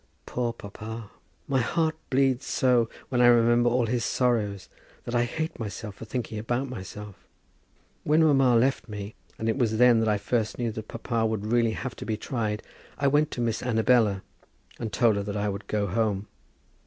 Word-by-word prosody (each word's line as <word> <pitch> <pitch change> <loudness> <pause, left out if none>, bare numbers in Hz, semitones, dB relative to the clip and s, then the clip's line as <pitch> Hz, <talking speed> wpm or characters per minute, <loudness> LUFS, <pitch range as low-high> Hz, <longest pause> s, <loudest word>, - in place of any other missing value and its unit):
Poor 120 -1 -1
papa! 110 0 -8 0.4
My 135 -2 +2
heart 160 +6 +1 0.2
bleeds 130 -1 +2
so 125 -3 +2 0.2
when 125 -2 +1
I 120 - +7
remember 120 0 +5
all 120 0 +2
his 120 +1 -1
sorrows, 110 -6 0 0.4
that 120 - -6
I 120 0 +3
hate 160 +6 -4
myself 105 -1 -5
for 110 - -10
thinking 115 -2 -4
about 120 +5 -1
myself. 105 -3 -9 0.8
When 155 +2 +4
mamma 135 -5 +4
left 130 +1 +2
me, 105 0 -6 0.2
and 110 - -3
it 115 +4 0
was 110 -3 +1
then 115 -2 +5
I 105 -1 +2
first 110 +2 -1
knew 120 -2 -1
that 110 0 -7
papa 115 -1 -1
would 110 -2 -2
really 115 -2 +3
have 130 +1 -5
to - - -7
be 110 -1 -1
tried, 110 -3 -3 0.3
I 140 - +1
went 145 +2 +3
to 120 - -4
Miss 115 -2 -1
Annabella, 110 -4 +2 0.6
and 115 -2 -4
told 115 -4 +3
her 100 - -1
that 100 +1 -4
I 105 0 0
would 100 0 -6
go 105 -1 0
home. 100 0 0
115 Hz, 185 wpm, -27 LUFS, 105-125 Hz, 0.8 s, I